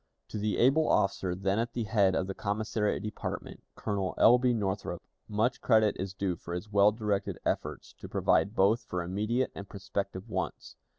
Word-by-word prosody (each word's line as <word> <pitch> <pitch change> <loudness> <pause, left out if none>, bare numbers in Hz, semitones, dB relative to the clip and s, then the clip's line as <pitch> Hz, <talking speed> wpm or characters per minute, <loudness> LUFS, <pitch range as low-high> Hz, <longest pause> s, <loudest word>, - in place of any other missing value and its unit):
To 105 - -4
the 105 0 0
able 140 +6 +4
officer 95 -2 +1
then 95 +2 0
at 115 +1 -2
the 120 - -1
head 100 -4 +3
of 95 - 0
the 95 - -4
commissariat 105 0 -1
department, 105 - -5
Colonel 100 -3 -2
L. 125 +2 +7
B. 125 0 +3
Northrop, 100 -5 -2 0.3
much 115 +4 0
credit 110 -3 +4
is 95 0 -4
due 95 -2 -1
for 85 +1 -6
his 105 +4 -6
well 100 0 +5
directed 105 -2 -2
efforts - - -3
to - - -9
provide 100 +3 +2
both 105 +5 +4
for 90 -1 -3
immediate 105 +8 -1
and 100 - -8
prospective 100 0 -4
wants. 110 - -4
105 Hz, 180 wpm, -30 LUFS, 95-110 Hz, 0.3 s, L